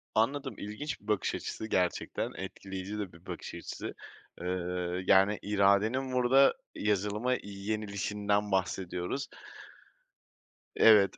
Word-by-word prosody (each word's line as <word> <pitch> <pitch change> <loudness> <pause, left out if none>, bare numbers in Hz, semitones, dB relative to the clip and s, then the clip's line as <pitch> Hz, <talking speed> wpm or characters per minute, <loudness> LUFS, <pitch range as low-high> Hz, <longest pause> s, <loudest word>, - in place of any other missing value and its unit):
Anladım, 135 +5 +1
ilginç 105 +8 -5
bir 105 - -19
bakış 105 -2 +1
açısı. 110 - -4
Gerçekten 90 -4 0
etkileyici 95 +2 -6
de 95 -4 -4
bir 85 - -17
bakış - - -6
açısı. - - -6 0.5
Eee, 90 - -3 0.6
yani, 95 +2 +5
iradenin 105 +6 +2
burada 125 +2 +5 0.2
yazılıma 105 +4 +1
yenilişinden 105 0 -1
bahsediyoruz. 95 +5 -1 1.5
Evet, 105 -3 +6
105 Hz, 100 wpm, -31 LUFS, 100-110 Hz, 1.5 s, Evet